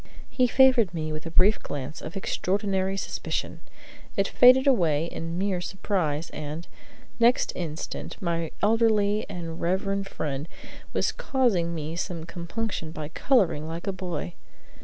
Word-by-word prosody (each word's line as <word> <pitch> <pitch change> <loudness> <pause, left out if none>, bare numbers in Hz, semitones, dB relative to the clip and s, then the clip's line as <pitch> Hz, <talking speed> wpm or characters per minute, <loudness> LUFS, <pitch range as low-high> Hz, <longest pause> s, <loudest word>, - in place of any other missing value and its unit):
He 250 0 +3
favored 245 -7 +5
me 155 -1 -2
with 155 +1 -5
a - - -4
brief 190 +6 +4
glance 145 +1 -5
of 160 +5 -6
extraordinary 195 0 0
suspicion. 160 -3 -3 0.6
It 195 0 +3
faded 255 +2 +6
away 165 - +3
in 165 0 -5
mere 190 -1 0
surprise, 175 -5 -2
and, 155 +3 -6 0.5
next 235 +2 +4
instant, 165 -2 -5
my 170 -4 -1
elderly 215 -1 +3
and 170 -4 -6
reverend 195 +3 0
friend 145 -4 -4 0.4
was - - +1
causing 195 -11 +1
me 155 +1 -4
some 170 -1 -3
compunction 170 +2 -4
by 155 -1 -6
coloring 180 - +2
like 165 +2 -5
a 195 - -1
boy. 180 -1 -4
180 Hz, 140 wpm, -26 LUFS, 160-205 Hz, 0.6 s, faded